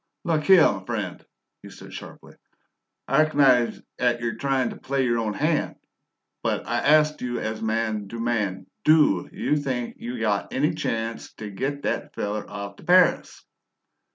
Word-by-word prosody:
"Luk 160 -3 0
here, 190 -4 +7
m'friend," 95 -9 -1 0.4
he - - -11
said - - -12
sharply - - -10 0.7
"I 145 +3 +4
reco'nise 135 -6 +3 0.2
'at 120 -1 +2
you're 115 -1 -2
tryin' 135 -2 0
t' - - -9
play 135 0 -1
your 120 -1 +1
own 110 -2 -2
hand, - - 0 0.7
but - - -1
I - - 0
ast 150 0 +3
you 120 -1 -2
as 110 0 -4
man 110 -2 -1
to 115 +3 -7
man: 105 -5 -1 0.2
DO 155 -1 +4
you - - 0
think 130 -4 -3
you 120 0 -5
got 105 -2 -1
any 150 +5 +2
chanst 115 -7 -4
t' 105 -2 -7
git 140 +7 -3
that 150 - -3
feller 105 +1 -3
off 100 -1 -7
t' - - -15
Paris?" 180 0 +3
120 Hz, 160 wpm, -24 LUFS, 110-145 Hz, 0.7 s, here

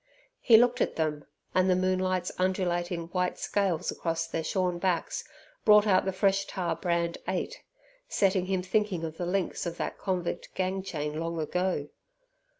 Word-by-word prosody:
He 230 -3 +7
looked 245 +2 +3
at - - +1
them, 150 -2 -1 0.3
and 185 0 +3
the 185 - +5
moonlight's 185 0 0
undulating 175 -2 0
white 180 0 -1
scales 185 -4 0
across 165 -1 -2
their 165 0 -3
shorn 180 +1 0
backs 180 -2 -1 0.4
brought 210 0 +7
out 190 -3 +4
the 190 - +1
fresh 195 +1 +1
tar 180 -3 -2
brand 170 0 -1
8, - - -2 0.5
setting 190 -2 +2
him 190 -1 0
thinking 190 -2 0
of 160 0 -5
the 175 - -3
links 185 -1 -1
of 170 0 -5
that - - -4
convict 180 -3 -3
gang 190 +1 -1
chain 150 -5 -4
long 165 0 -3
ago. 160 -2 -1
180 Hz, 160 wpm, -29 LUFS, 170-190 Hz, 0.5 s, He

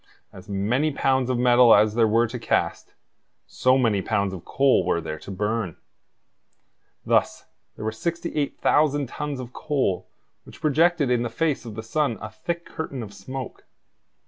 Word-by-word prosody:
As 95 +3 -13
many 115 +10 0
pounds 130 -2 +1
of 125 - +1
metal 125 -1 +6
as 105 0 +4
there 115 0 +3
were 115 +2 +3
to 110 - -6
cast, - - -1 0.5
so 130 +1 +2
many 115 -6 +2
pounds 100 +1 -1
of 90 - -8
coal 135 -8 +3
were 85 -1 +1
there 80 -1 -6
to - - -12
burn. 105 -2 -2 1.3
Thus - - +1 0.3
there - - -7
were 110 - 0
68,000 150 0 0
tons 145 +1 -5
of 125 -1 -8
coal 135 -11 -1 0.4
which - - -14
projected 155 -2 +2
in 120 -1 +2
the 120 - -2
face 155 -4 -1
of 110 -3 -8
the 110 - -6
sun 120 0 0
a 110 +1 -7
thick 170 +10 -4
curtain 140 -6 -5
of 100 -2 -10
smoke. 130 +7 -8
120 Hz, 165 wpm, -24 LUFS, 105-145 Hz, 1.3 s, metal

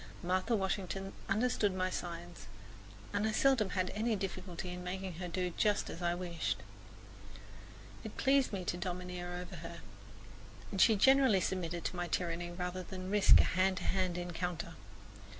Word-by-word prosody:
Martha 185 +6 +1
Washington 195 -1 -2 0.2
understood 210 -2 +2
my 185 0 0
signs, 175 0 -6 0.7
and 205 +2 +1
I - - +1
seldom 235 -2 +3
had 185 -2 -1
any 220 +2 0
difficulty 185 -2 -4
in 180 0 -6
making 185 +1 -4
her 180 - -3
do 180 +1 -1
just 210 -1 +1
as 170 - -8
I 175 0 +1
wished. 175 -2 -2 1.5
It - - -8
pleased 270 -1 +3
me 190 -3 -3
to 175 - -1
domineer 180 0 -4
over 180 0 -6
her, - - -8 0.9
and 195 -2 +1
she 220 - +7
generally 265 -1 +6
submitted 175 -2 -2
to - - -2
my 175 0 -2
tyranny 175 0 -1
rather 180 +1 -4
than 185 +1 -6
risk 205 -1 +7
a - - +2
hand 185 +1 +2
to 185 - -3
hand 185 -2 0
encounter. 175 -2 -3
185 Hz, 160 wpm, -34 LUFS, 175-195 Hz, 1.5 s, she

